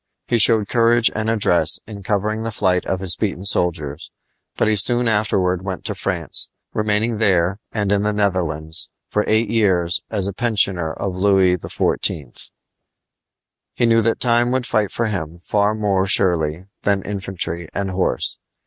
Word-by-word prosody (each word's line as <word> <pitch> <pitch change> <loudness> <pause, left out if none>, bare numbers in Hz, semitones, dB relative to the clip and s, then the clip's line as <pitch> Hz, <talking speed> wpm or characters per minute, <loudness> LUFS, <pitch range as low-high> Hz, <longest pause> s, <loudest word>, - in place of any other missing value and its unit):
He 120 - 0
showed 110 -1 +4
courage 115 0 +3
and 110 +1 -2
address 105 -6 +2
in 105 -2 -9
covering 105 +2 -1
the 115 - -3
flight 95 -4 0
of 95 -1 -2
his 95 -3 +3
beaten 100 -3 -3
soldiers; 80 -6 0 0.5
but - - +1
he 110 - +2
soon 120 +4 +2
afterward 95 -4 +1
went 95 -2 -6
to - - 0
France, - - +1 0.2
remaining 105 +1 0
there 95 -2 +2
and 105 -3 -1
in 100 -1 +2
the 105 +1 0
Netherlands 85 -6 -2 0.2
for 105 - 0
eight 110 0 +1
years 95 -6 +1
as 100 -4 +1
a 100 - -2
pensioner 95 -7 0
of 95 +1 -4
Louis 95 -1 +3
XIV. 75 -5 -3 1.3
He - - +1
knew 115 0 +4
that 115 +1 0
time 120 0 +2
would 130 0 -1
fight 110 -5 0
for 115 - -2
him 85 -6 -4
far 105 +4 0
more 100 -3 0
surely 85 -3 +2 0.2
than 100 -2 0
infantry 95 -4 -3
and 100 -1 -2
horse. 90 -9 -1
100 Hz, 160 wpm, -20 LUFS, 90-110 Hz, 1.3 s, showed